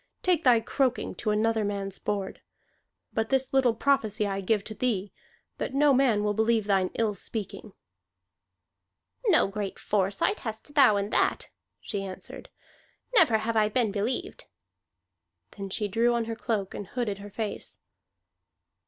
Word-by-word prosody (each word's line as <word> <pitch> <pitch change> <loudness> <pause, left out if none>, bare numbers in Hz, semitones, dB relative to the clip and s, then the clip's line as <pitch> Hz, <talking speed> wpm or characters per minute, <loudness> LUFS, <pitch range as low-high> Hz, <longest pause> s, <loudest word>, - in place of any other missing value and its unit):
"Take 360 -3 +3
thy 245 -5 +5
croaking 255 +2 0
to 215 - -3
another 220 +1 +1
man's 200 -1 -3
board! 200 -2 -3 0.7
But 220 0 -1
this 265 -1 0
little 255 -4 +3
prophecy 220 -6 +1
I 195 -1 -2
give 205 +1 +1
to 215 - -6
thee, 210 -5 -1 0.5
that - - -3
no 290 0 +5
man 250 -6 +3
will 210 0 +1
believe 220 0 +2
thine 195 -2 +2
ill 220 -2 +1
speaking." 205 +1 -6 1.5
"No 345 - +5
great 200 0 -4
foresight 200 - 0
hast 220 +5 -7
thou 275 -8 +6
in 200 +2 -2
that," - - +1 0.3
she 200 -3 -4
answered. 190 -1 -8 0.6
"Never 320 - +5
have 225 +1 -2
I 215 -1 +3
been 225 -1 +1
believed." 215 +5 -3 1.1
Then 195 -1 -7
she 210 +2 -2
drew 230 +4 +2
on 235 -1 0
her 225 0 -4
cloak 220 -4 -2
and 205 - -6
hooded 215 -4 -3
her 205 +1 -9
face. 215 +1 -5
220 Hz, 150 wpm, -27 LUFS, 200-240 Hz, 1.5 s, thou